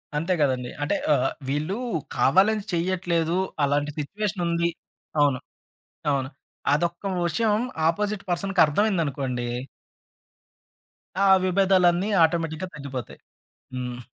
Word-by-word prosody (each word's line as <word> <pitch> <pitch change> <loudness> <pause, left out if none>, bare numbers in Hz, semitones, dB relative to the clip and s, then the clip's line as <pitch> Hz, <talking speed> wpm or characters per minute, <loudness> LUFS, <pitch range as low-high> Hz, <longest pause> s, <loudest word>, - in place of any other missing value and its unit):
అంతే 165 +5 +1
కదండీ. 130 -3 +1
అంటే 145 - +1 0.2
ఆహ్, 135 -1 +2 0.2
వీళ్ళు 155 +8 -1 0.4
కావాలని 200 +8 +4
చేయట్లేదు. 170 -1 0 0.3
అలాంటి 145 +1 +1
సిట్యుయేషన్ 195 +5 -3
ఉంది. 170 0 +1 0.5
అవును. 140 -3 +3 0.7
అవును. 135 -1 -1 0.4
అదొక్క 170 +5 0 0.2
విషయం 210 +6 +1 0.3
ఆపోజిట్ 200 +3 -1
పర్సన్‌కి 195 +2 0
అర్థమైందనుకోండి. 145 - 0 1.8
ఆ - - +5 0.2
విభేదాలన్నీ 185 0 +3
ఆటోమేటిక్‌గా 165 +1 0
తగ్గిపోతాయి. 135 -4 -7 0.6
హ్మ్. 125 -1 -4
170 Hz, 95 wpm, -25 LUFS, 145-190 Hz, 1.8 s, ఆ